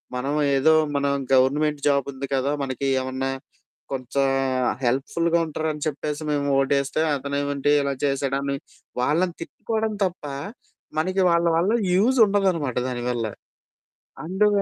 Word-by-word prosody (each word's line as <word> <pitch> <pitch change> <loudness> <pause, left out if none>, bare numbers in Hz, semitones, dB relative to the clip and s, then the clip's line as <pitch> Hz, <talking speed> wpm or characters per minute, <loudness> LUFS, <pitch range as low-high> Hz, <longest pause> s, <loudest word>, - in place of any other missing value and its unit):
మనం 135 +3 -2 0.2
ఏదో 155 +4 +4 0.2
మనం 140 0 +1 0.2
గవర్నమెంట్ 145 +3 +3
జాబ్ 140 -1 +2
ఉంది 135 +1 -6
కదా! 135 +2 0
మనకి 135 +1 -3
ఏమన్నా 130 +1 -3 0.6
కొంచెం 135 +1 0 0.6
హెల్ప్‌ 130 +3 +1
ఫుల్‌గా 170 0 +2
ఉంటారని 155 -1 -3
చెప్పేసి 150 +1 -3
మేము 145 -1 0
ఓటేస్తే 140 +2 0
అతనే 140 +1 -3
ఏమంటి 145 0 0
ఇలా 140 0 -1
చేసేడాన్ని 140 0 -1 0.5
వాళ్ళని 170 +6 +1
తిట్టుకోవడం 220 +5 -3
తప్ప 175 -4 -5 0.7
మనకి 185 +4 0
వాళ్ళ 170 0 +2
వల్ల 185 +6 +2 0.2
యూజ్ 235 +8 +3
ఉండదనమాట 180 - 0
దాని 120 -1 -4
వల్ల. 120 -2 -1 1.0
అండు 190 +5 +2
140 Hz, 125 wpm, -24 LUFS, 135-165 Hz, 1.0 s, ఏదో